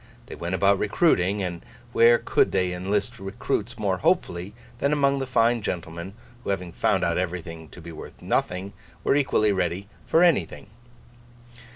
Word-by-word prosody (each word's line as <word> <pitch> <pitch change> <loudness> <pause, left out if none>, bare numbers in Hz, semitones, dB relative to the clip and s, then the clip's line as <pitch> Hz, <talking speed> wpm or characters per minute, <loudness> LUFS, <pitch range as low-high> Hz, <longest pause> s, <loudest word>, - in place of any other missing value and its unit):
They - - -10
went 85 +2 -3
about 100 +1 +3
recruiting; 100 - +2
and 90 -2 -4 0.3
where 120 +1 +6
could - - +2
they 90 -1 +1
enlist 100 +6 -2
recruits 110 +3 -3
more 100 -4 0
hopefully, 95 - 0 0.2
than 140 - +1
among 140 -2 +2
the 135 - -3
fine 120 -1 +3
gentlemen 85 0 -5 0.3
who, - - -5
having 90 -3 -2
found 95 +2 +1
out 85 0 +1
everything 85 -3 -5
to - - -13
be 85 0 -9
worth 80 - -10
nothing, 95 +3 -1 0.3
were - - +3
equally 130 -7 +3
ready 95 +1 -1 0.2
for 165 - +4
anything? 170 -10 +1
95 Hz, 160 wpm, -25 LUFS, 90-115 Hz, 0.3 s, where